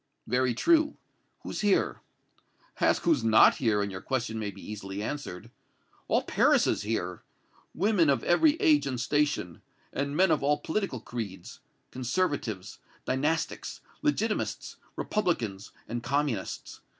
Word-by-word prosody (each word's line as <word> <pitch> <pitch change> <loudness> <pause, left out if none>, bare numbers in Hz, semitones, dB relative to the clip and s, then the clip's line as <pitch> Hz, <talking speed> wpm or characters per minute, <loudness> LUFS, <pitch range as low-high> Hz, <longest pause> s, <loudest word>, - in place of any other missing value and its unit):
"Very 125 0 +1
true. 315 - +3 0.5
Who's - - -5
here?" 205 -2 +2 0.8
"Ask - - +2
who's 155 -8 +3
not 110 -1 +6
here, 110 -5 +2
and 100 - -3
your 95 -1 -6
question 120 -4 -2
may 105 -2 -2
be 100 -1 -11
easily 100 -1 -6
answered. 125 -9 -5 0.6
All - - +2
Paris - - +3
is - - +1
here! 95 -5 -3 0.5
Women 185 -3 +3
of 140 - +2
every 290 - +4
age 320 -5 +3
and 130 -3 -2
station, 145 - 0 0.3
and 140 +1 -2
men 190 +1 +4
of 150 - +2
all 145 +1 +2
political 160 - -2
creeds 105 -8 -7 0.3
Conservatives, 130 - -2 0.3
Dynastics, 155 +5 -1 0.2
Legitimists, 225 -8 -1 0.2
Republicans 115 - -1 0.2
and 120 +1 -3
Communists. 130 -4 -2
130 Hz, 130 wpm, -28 LUFS, 110-170 Hz, 0.8 s, not